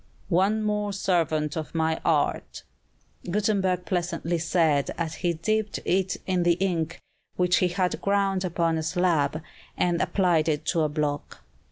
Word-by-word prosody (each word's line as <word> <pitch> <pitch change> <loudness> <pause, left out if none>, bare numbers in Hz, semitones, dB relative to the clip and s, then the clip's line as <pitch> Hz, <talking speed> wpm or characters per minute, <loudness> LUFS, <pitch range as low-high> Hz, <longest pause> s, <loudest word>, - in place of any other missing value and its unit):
"One 200 +5 +2
more 210 -1 -1
servant 160 -6 0
of 160 0 -5
my 160 0 0
art," 155 -3 0 0.7
Gutenberg 190 -2 0
pleasantly 175 -1 -1
said 160 -4 +2
as 165 -2 -2
he 175 -1 +1
dipped 215 +6 -1
it 190 0 +1
in 185 -2 +1
the 175 0 +4
ink 175 -2 -1 0.4
which 180 -1 +3
he 180 - +3
had 180 +1 -1
ground 200 -1 +1
upon 170 -2 0
a - - -2
slab, 160 -3 0 0.3
and 175 -1 +1
applied 170 -5 +2
it 150 0 -1
to 165 - +2
a 155 - +1
block. 145 -1 -3
175 Hz, 150 wpm, -26 LUFS, 160-190 Hz, 0.7 s, the